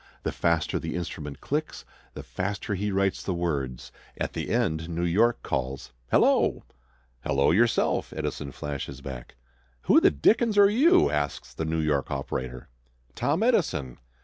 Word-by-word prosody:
The - - -1
faster 85 -2 0
the - - -4
instrument 75 -5 -5
clicks, 155 +2 -3 0.3
the - - -7
faster 100 +2 -3
he 100 +2 -1
writes 95 0 0
the 95 - -2
words. 70 -8 -3 0.3
At - - -2
the - - -4
end 85 -9 0
New 85 +1 -2
York 110 +8 +2
calls: 65 -1 -3 0.2
"Hello!" - - +3 0.6
"Hello 70 0 +2
yourself!" 115 +7 +2
Edison 70 -2 -4
flashes 70 +2 -6
back. 65 -3 -8 0.5
"Who - - +5
the - - +6
dickens 210 - +2
are 200 0 +7
you?" 330 - +5
asks 75 -1 -3
the 80 - -3
New 80 +1 -1
York 75 -3 0
operator. 65 -2 -4 0.5
"Tom 155 - 0
Edison." 160 - 0
85 Hz, 150 wpm, -26 LUFS, 70-115 Hz, 0.6 s, are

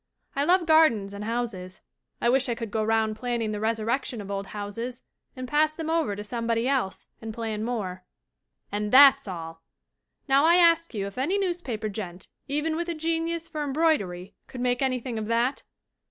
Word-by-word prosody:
I 280 +1 +1
love 355 +1 +4
gardens 310 -12 +4
and 205 +1 -6
houses. 220 -6 -4 0.4
I - - +1
wish 255 +1 +3
I 235 - 0
could 230 -3 -6
go 220 0 0
round 220 0 +1
planning 235 -1 -2
the 210 - -3
resurrection 225 +3 -1
of 200 -1 -7
old 195 0 -3
houses 230 +5 -6 0.3
and 255 -1 -6
pass 305 +3 +2
them 320 -1 -3
over 325 -11 +1
to 205 - -6
somebody 230 +2 -1
else 260 -8 -1 0.2
and 225 0 -5
plan 220 -1 -4
more. 195 -6 -3 0.7
"And 210 +1 -2
that's 270 -3 +8
all! 165 -3 -7 0.7
Now 275 +1 +4
I 335 +2 +6
ask 335 -5 +4
you 200 -2 -2
if 200 +5 -7
any 340 +10 +1
newspaper 345 - -2
gent, 190 -3 -7 0.2
even 300 +3 -1
with 340 +1 -3
a 340 - -2
genius 330 +1 -1
for 305 -2 -4
embroidery, 265 - 0
could 250 - -7
make 245 0 +1
anything 255 -3 -1
of 215 - -4
that? 235 +4 +1
235 Hz, 185 wpm, -26 LUFS, 210-295 Hz, 0.7 s, that's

